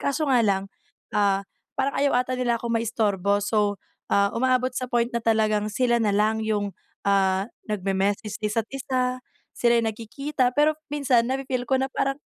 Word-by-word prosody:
Kaso 280 +2 0
nga 255 -2 +4
lang, 195 -1 +1 0.5
ah, 200 -1 +2 0.3
parang 270 +1 0
ayaw 280 -2 +2
ata 255 - -4
nila 240 -2 +1
ako 235 0 -3
maistorbo, 205 -4 +1
so, 205 -1 +1 0.3
ah, 200 0 +2
umaabot 255 +1 +1
sa 255 0 -3
point 240 0 0
na 235 - -1
talagang 215 -2 +1
sila 235 +2 +1
na 220 - +2
lang 210 +2 +2
yung, 210 -2 -1 0.3
ah, 195 -1 +2 0.2
nagme-message 200 +1 -1
isa't 215 +1 -1
isa, 255 -1 -1 0.3
sila'y 235 -1 +2
nagkikita. 250 +4 -2
Pero 300 +1 +4 0.2
minsan 270 -5 +2
nafe-feel 260 -2 -2
ko 265 - +3
na 265 - -2
parang, 275 0 0
230 Hz, 160 wpm, -25 LUFS, 205-255 Hz, 0.5 s, nga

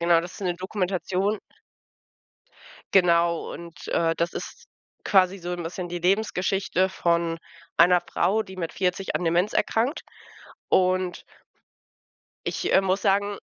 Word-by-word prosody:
Genau, 170 -1 +4
das 175 +2 -8
ist - - -11
'ne 180 -2 0
Dokumentation 190 +2 -1 1.6
Genau, 170 -2 +3
und, 170 -3 -10
äh, 165 -1 +1
das 170 +1 -1
ist - - -7 0.4
quasi 190 0 +3
so 175 0 -6
'n 175 -1 -4
bisschen 175 +2 -5
die 175 0 -4
Lebensgeschichte 190 0 +1
von 170 -2 0 0.4
einer 180 +1 +6
Frau, 215 +5 0
die 190 - -11
mit 170 -3 -4
40 190 +1 -1
an 180 - -3
Demenz 175 +5 +2
erkrankt. 240 +7 0 0.7
Und 185 -1 +1 1.2
ich, - - -1
äh, - - +6
muss 190 +1 +1
sagen 200 0 +1
180 Hz, 135 wpm, -25 LUFS, 170-195 Hz, 1.6 s, einer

